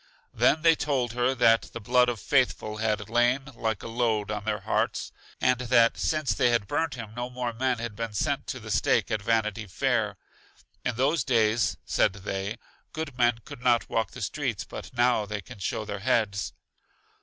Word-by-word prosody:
They - - +4
then 165 +1 +4
told 130 -5 0
her 125 +2 +1
that 115 -2 +4
the - - -5
blood 125 +3 +3
of 120 -3 -3
Faithful 125 -5 +1
had 105 -2 -1
lain 120 +4 +2
like 110 -3 -2
a - - -5
load 115 -3 0
on 105 -1 -4
their 105 -2 -1
hearts; - - -1 0.3
and 125 -1 +2
that 120 -2 +4
since, 155 -3 0
they 120 - +3
had 120 -3 +1
burnt 150 +5 -1
him 115 -3 -8
no 120 +1 -3
more 125 -1 -3
men 125 +1 0
had 115 -2 -5
been 115 -1 -4
sent 100 - -1
to - - -4
the - - -7
Stake - - +2
at 110 -2 0
Vanity 110 0 0
Fair. 90 - 0 0.7
In 125 - -1
those 140 +7 +2
days, 110 -3 +2
said - - +2
they, 100 +2 -4 0.4
good 155 -4 -5
men 120 -2 +2
could 145 -4 -10
not 120 -2 +2
walk 115 -3 0
the - - -7
streets, - - -2
but - - -8
now 120 -3 +2
they 105 0 -3
can 100 +1 -11
show 105 +3 -2
their 100 -1 -5
heads. 105 -3 0
115 Hz, 190 wpm, -27 LUFS, 110-125 Hz, 0.7 s, They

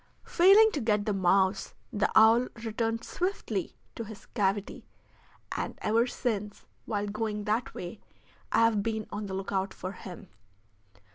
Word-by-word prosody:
Failing 400 +5 +6
to 295 - -2
get 210 -2 +1
the 210 - 0
mouse, 190 +1 +2 0.2
the 205 0 +1
owl 225 +3 +6 0.2
returned 225 +1 -1
swiftly 370 +9 -3 0.2
to 230 - -5
his 220 -1 -10
cavity, 200 -2 -2 0.7
and - - -3
ever 230 +3 +3
since, 210 -5 -3 0.2
while 205 -2 -1
going 210 0 -3
that 220 +4 -1
way, 180 +4 -7 0.5
I - - +4
have 230 -2 +4
been 220 0 -2
on 205 0 -4
the 190 - -4
lookout 195 0 -2
for 185 - -5
him. 185 -2 -10
215 Hz, 145 wpm, -29 LUFS, 200-230 Hz, 0.7 s, Failing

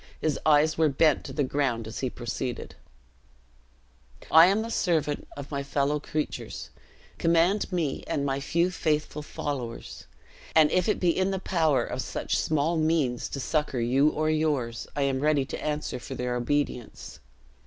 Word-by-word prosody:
His 155 -3 0
eyes 155 +1 +4
were 160 -2 +4
bent 150 +1 +3
to - - -6
the 145 - 0
ground 130 -4 -1
as 110 - -6
he 130 - -1
proceeded: 120 0 -5 1.6
"I 165 +2 +9
am 200 +4 +2
the 230 - -5
servant 160 -8 0
of 140 +1 -8
my 140 -1 -2
fellow 140 +1 0
creatures 150 +1 -4 0.5
command 170 +6 +2
me 165 -6 -1
and 140 - -1
my 135 0 0
few 170 +6 +1
faithful 150 -3 -1
followers; 135 -5 -6 0.5
and 155 -2 +6
if 180 +2 +2
it - - +1
be 175 -2 +2
in 190 +1 +1
the 195 - -1
power 160 -6 +1
of - - -3
such - - -2
small 155 +2 +1
means 155 -6 +1
to 140 - -5
succor 150 -1 -1
you 130 +5 +3
or 155 0 -1
yours, 145 -7 -1
I 145 - +1
am 135 -1 0
ready 145 -1 +2
to - - -6
answer 150 -3 -2
for - - -7
their 125 0 -2
obedience. 125 -2 -2
150 Hz, 165 wpm, -27 LUFS, 135-160 Hz, 1.6 s, I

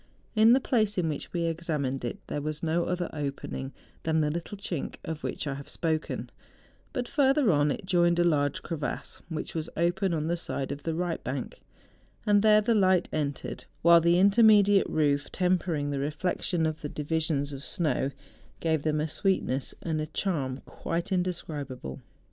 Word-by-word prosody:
In 220 +2 +7
the 260 - +5
place 215 -6 +1
in 170 -3 +1
which 150 - -5
we 170 -1 -1
examined 155 -6 -2
it, 120 - -3
there 145 - -3
was 155 +1 -4
no 165 +1 +1
other 180 -1 -1
opening 140 -2 -4 0.3
than 160 0 +1
the 150 -1 +2
little 170 +5 -5
chink 185 -7 -4
of 160 -2 -4
which - - -3
I 140 - -2
have 140 +1 -8
spoken; 160 -2 -2 0.6
but 250 -1 -3
further 275 -4 +3
on, 145 -1 +3
it 185 - -3
joined 175 -2 +3
a 175 - +4
large 145 -4 +1
crevasse 155 -4 -4
which 160 -2 -4
was 160 -1 -3
open 175 +3 +1
on 155 -1 -1
the 170 +2 0
side 140 -5 -3
of 140 +1 -5
the 165 +2 -2
right 175 -1 -2
bank, 130 -1 -5 0.6
and 205 -1 +5
there 215 0 +6
the 230 +2 +2
light 185 -4 +3
entered, 145 -3 -3 0.2
while 170 0 +8
the 170 +1 +4
intermediate 205 0 +6
roof 145 -2 +1
tempering 180 -5 0
the 140 - -1
reflexion 160 +3 0
of 155 0 -2
the 150 - -4
di¬ 150 - -5
visions 150 -2 0
of 135 - -7
SDow, 150 -3 0 0.5
gave 160 -2 +1
tliem 150 0 0
a - - -1
sweetness 155 -6 0
and 160 -2 -1
a 155 - -3
charm 145 -6 -2
quite 170 +3 -4
indescribable. 150 - -3
160 Hz, 180 wpm, -28 LUFS, 145-185 Hz, 0.6 s, while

